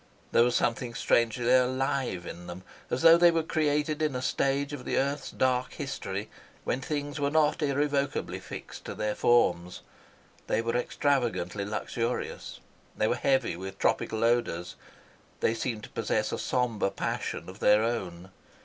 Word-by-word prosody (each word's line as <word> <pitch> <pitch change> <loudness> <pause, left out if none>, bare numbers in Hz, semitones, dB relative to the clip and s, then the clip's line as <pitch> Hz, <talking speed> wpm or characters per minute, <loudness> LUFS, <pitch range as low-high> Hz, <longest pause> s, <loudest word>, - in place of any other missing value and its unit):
There - - +5
was 120 0 +1
something 120 0 0
strangely 120 0 +2
alive 130 -6 +1
in 85 +1 -8
them, 90 +1 -8 0.3
as 130 - -1
though 165 0 +9
they 175 0 +7
were 165 -1 +1
created 150 -1 0
in 150 -4 0
a 125 - -2
stage 140 +1 0
of 135 -4 -6
the - - -1
earth's 140 +2 -1
dark 130 -1 0
history - - -4 0.4
when 130 - -1
things 145 +1 -3
were 140 0 +1
not 155 +1 +2
irrevocably 140 -1 0
fixed - - -9
to - - -5
their 105 0 -1
forms. 90 -8 +2 0.7
They - - +1
were 115 +1 -1
extravagantly 120 -8 0
luxurious. 115 +3 -3 0.4
They - - +2
were - - +2
heavy 135 -7 +1
with 95 +2 -7
tropical 110 0 0
odours. 115 -7 0 0.6
They 110 - +2
seemed 115 -2 -3
to - - -9
possess - - -1
a - - -3
sombre 120 -6 0
passion - - -3
of 95 +3 -10
their 105 +1 +5
own. 95 -6 -3
125 Hz, 160 wpm, -28 LUFS, 110-140 Hz, 0.7 s, though